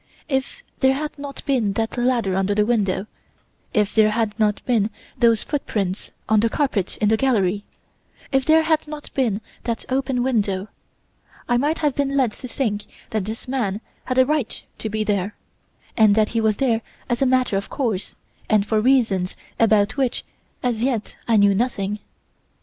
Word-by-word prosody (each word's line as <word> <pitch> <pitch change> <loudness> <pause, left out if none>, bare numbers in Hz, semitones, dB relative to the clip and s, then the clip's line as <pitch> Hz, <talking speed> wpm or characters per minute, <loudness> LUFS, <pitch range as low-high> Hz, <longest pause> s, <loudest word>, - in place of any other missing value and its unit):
If 295 - -2 0.2
there 265 0 +4
had 300 +2 -4
not 280 -1 -7
been 245 -8 +1
that 225 +2 -2
ladder 240 -6 +1
under 195 +1 +1
the 210 0 +3
window; 200 -4 +1 0.7
if 210 -1 +1
there 215 -1 +5
had 215 -1 0
not 210 -1 +1
been 225 -4 +2 0.3
those 230 -2 +4
footprints 205 -10 -2 0.2
on 220 0 +4
the 230 +2 +3
carpet 230 - -1
in 210 - +2
the 220 - +3
gallery; 205 -6 +1 0.7
if 270 -1 +3
there 320 +3 +5
had 315 -1 +1
not 300 -1 -8
been 225 -6 0 0.2
that 230 -1 -2
open 260 -1 0
window, 210 -6 0 0.8
I 240 - +3
might 295 +6 +1
have 290 - +3
been 280 0 0
led 255 -5 +3
to 255 - -8
think 210 -5 -2 0.3
that 215 -3 -1
this 220 +4 -6
man 225 -7 -1 0.3
had 255 - -2
a 260 - +6
right 295 -4 -1 0.2
to 220 - -3
be 215 0 -1
there, 205 -1 -1 0.6
and 215 -3 +5
that 215 -1 +3
he 230 - 0
was 215 -2 +2
there 235 -4 +2 0.3
as 240 +1 -1
a 270 - +4
matter 255 -4 +2
of 195 0 -2
course 225 -8 -2 0.3
and 210 -2 +3
for 215 0 +1
reasons 220 -8 +2 0.2
about 215 0 +3
which 265 -3 0 0.4
as 240 -3 0
yet 240 -4 -1
I 230 -2 +4
knew 200 -1 +5
nothing. 210 -2 -1
225 Hz, 180 wpm, -22 LUFS, 210-260 Hz, 0.8 s, a